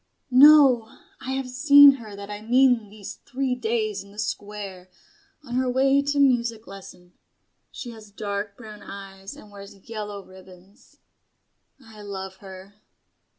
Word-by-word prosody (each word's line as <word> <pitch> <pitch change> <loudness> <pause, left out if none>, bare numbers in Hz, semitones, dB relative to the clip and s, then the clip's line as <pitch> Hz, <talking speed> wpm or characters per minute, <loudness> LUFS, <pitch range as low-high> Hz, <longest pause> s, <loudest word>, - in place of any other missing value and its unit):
"No. 265 -3 +6 0.3
I 260 - -5
have 265 -1 -3
seen 285 +2 +7
her 215 -3 -10
that 200 +1 -9
I 205 0 -7
mean 245 -1 +2
these 205 -1 -10
three 270 -1 -2
days 220 -4 -2
in 200 - -17
the 205 - -18
Square, 200 -3 -6 0.5
on 245 -4 -9
her 255 0 0
way 270 +2 +2
to 285 0 -2
music 235 -5 +1
lesson. 180 -2 -13 0.6
She 245 - -8
has 220 -2 -14
dark 200 0 -5
brown 215 -3 -12
eyes 195 0 -10
and 210 - -15
wears 200 0 -12
yellow 210 -3 -7
ribbons. 185 +3 -18 0.9
I 220 -2 -14
love 190 -2 -8
her." 195 +1 -14
215 Hz, 145 wpm, -24 LUFS, 200-250 Hz, 0.9 s, seen